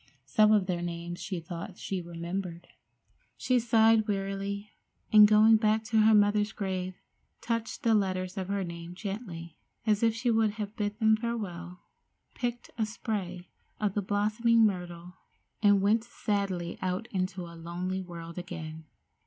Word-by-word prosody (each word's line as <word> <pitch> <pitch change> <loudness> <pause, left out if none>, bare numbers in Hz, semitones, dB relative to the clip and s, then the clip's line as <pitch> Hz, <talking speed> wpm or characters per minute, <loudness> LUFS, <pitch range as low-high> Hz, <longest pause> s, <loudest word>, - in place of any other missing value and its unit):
Some 215 +9 +4
of 210 -3 +4
their 180 -2 -2
names 175 0 -5
she 185 -3 -3
thought 175 +3 -7
she 190 -2 -3
remembered. 170 +1 -5 0.7
She 255 -1 +2
sighed 225 -1 +4
wearily, 200 +1 -3 0.4
and, 210 -1 +10
going 215 +1 +6
back 215 0 +2
to 220 0 +1
her 220 0 +6
mother's 205 0 +3
grave, 185 -2 -3 0.4
touched 230 -1 -3
the 230 - +4
letters 185 -3 0
of 190 -2 -3
her 200 0 -1
name 170 0 -7
gently, 190 -5 -6 0.3
as 215 -2 +2
if 225 -1 +3
she 240 +1 +1
would 220 -2 +2 0.2
bid 205 -2 -2
them 220 -1 +4
farewell, 185 -7 -5 0.5
picked 240 -1 -4
a 220 - +2
spray 190 -5 -4 0.3
of 210 -3 0
the 205 - 0
blossoming 215 +3 +3
myrtle, 180 -2 -3 0.4
and 205 -2 +5
went 220 +3 +3
sadly 200 -7 -2
out 185 +4 -2
into 185 -1 -2
a 170 - -10
lonely 175 +3 -4
world 170 -1 -8
again. 160 -3 -7
200 Hz, 150 wpm, -29 LUFS, 180-215 Hz, 0.7 s, and